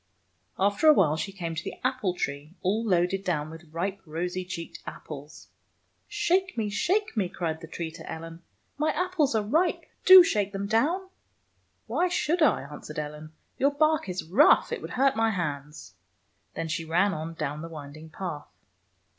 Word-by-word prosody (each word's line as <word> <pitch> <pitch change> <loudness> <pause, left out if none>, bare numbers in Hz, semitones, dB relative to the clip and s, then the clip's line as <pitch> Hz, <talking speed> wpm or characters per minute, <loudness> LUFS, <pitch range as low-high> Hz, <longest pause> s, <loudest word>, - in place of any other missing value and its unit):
After 200 +9 +2
awhile 190 - +6
she 195 +5 -3
came 175 -4 -5
to 160 - -4
the - - -5
apple 255 -8 0
tree, 145 +2 -4
all 205 +5 +1
loaded 185 -1 +1
down 155 -4 -1
with 165 -1 -12
ripe, 190 +4 -3
rosy 180 +3 -3
cheeked 175 -2 -7
apples. 150 0 -9 0.3
" - - -45 0.2
Shake 375 0 0
me 220 - 0
I - - -2
Shake 360 - 0
me!" 195 -5 0
cried 160 -3 -3
the 165 - -8
tree 165 0 -5
to 160 0 -9
Ellen. 165 +1 -8 0.2
" - - -44
My 305 +1 +2
apples 360 -8 +1
are 215 - +2
ripe. 320 - +1 0.2
Do 375 -1 +11
shake 205 - 0
them 195 0 -3
down! 295 - +1 0.3
" - - -45
" - - -44
Why 360 - +1
should 340 0 0
I? 300 -7 +4
" - - -15
answered 150 +1 -9
Ellen. 150 +1 -6
" - - -44
Your 280 +1 +2
bark 310 -7 +2
is 180 0 -3
rough. 230 - +5
It - - -3
would - - -6
hurt 270 +1 +4
my 225 0 +2
hands." 150 - -4 0.6
Then 165 - -3
she 160 +1 -2
ran 180 +5 +2
on 160 +1 -5
down 150 -1 -3
the 165 - -7
winding 155 0 -10
path. 160 -3 -6
185 Hz, 195 wpm, -27 LUFS, 160-250 Hz, 0.6 s, Do